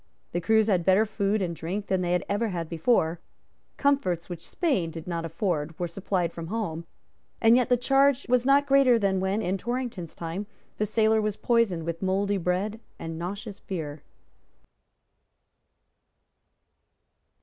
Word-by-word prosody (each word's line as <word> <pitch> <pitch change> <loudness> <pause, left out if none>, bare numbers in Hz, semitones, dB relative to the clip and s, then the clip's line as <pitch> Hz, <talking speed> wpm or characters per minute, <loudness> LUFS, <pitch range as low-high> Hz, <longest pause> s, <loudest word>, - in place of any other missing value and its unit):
The 175 - -1
crews 220 +4 +4
had 190 -5 +2
better 190 +4 +4
food 205 -1 0
and 170 -2 -3
drink 190 +6 -4
than 190 -2 0
they 175 0 0
had 180 - 0
ever 205 +3 0
had 170 -5 -3
before; 165 -1 +1 0.6
comforts 190 - +1
which 175 -2 -8
Spain 270 - 0
did 165 -1 -8
not 170 -2 -3
afford 165 -2 -2
were 175 - -2
supplied 175 -1 -2
from 165 -1 -6
home; 170 -5 -3 0.5
and 225 +1 +6
yet 250 -1 +2
the 245 - +4
charge 275 +2 +3
was 250 -1 +3
not 275 +2 +4
greater 275 -3 +5
than 195 -3 +1
when, 195 +3 0
in 190 +2 -1
Torrington's 240 -7 -4
time, 170 +5 -5 0.3
the 215 - +1
sailor 220 +1 +3
was 210 -1 -2
poisoned 230 -8 +1
with 165 0 -4
mouldy 195 +1 +1
biscuit 185 +5 -1 0.2
and 165 0 -6
nauseous 200 +4 -6
beer. 155 -6 -5
195 Hz, 155 wpm, -27 LUFS, 170-225 Hz, 0.6 s, and